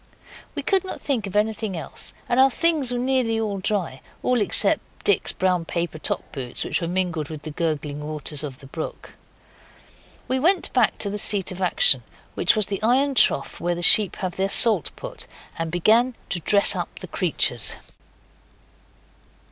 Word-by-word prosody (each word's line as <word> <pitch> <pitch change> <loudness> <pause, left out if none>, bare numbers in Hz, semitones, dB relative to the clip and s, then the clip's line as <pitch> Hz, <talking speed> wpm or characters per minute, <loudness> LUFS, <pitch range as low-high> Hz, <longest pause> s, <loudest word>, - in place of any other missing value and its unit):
We - - -4
could 385 -2 +1
not 375 - -7
think 240 -8 -2
of 195 - -8
anything 210 -2 -1
else, 155 - -4
and 245 - +1
our 265 +1 +6
things 310 -3 +1
were 245 - -2
nearly 225 -5 -1
dry 185 -10 -2 0.2
all 250 -2 +1
except - - +4 0.2
Dick's 415 - +2
brown 180 -2 0
paper 170 -1 -4
top - - -3
boots, 125 -3 -4
which - - -2
were 170 - -2
mingled 175 -4 -2
with 155 -2 -8
the 155 - -6
gurgling 150 -2 -3
waters 150 -1 -2
of 135 -4 -7
the 135 - -15
brook. 155 +4 -7 1.2
We 260 +1 0
went 355 +6 +1
back 250 -4 +2
to 200 - 0
the 210 - -2
seat 195 -2 +3
of 185 +1 -8
action 485 - +2 0.3
which - - +2
was 215 -2 +1
the 200 0 -5
iron 265 +5 +2
trough 140 - +1
where 175 0 -1
the 175 - -5
sheep 205 +3 +6
have 185 -2 -5
their 195 +1 0
salt 210 - +4
put - - -7 0.3
and 165 0 -2
began 225 +8 +2
to 180 - -1
dress 200 +4 +6
up - - -5
the - - -8
creatures. - - +1
195 Hz, 175 wpm, -23 LUFS, 165-240 Hz, 1.2 s, our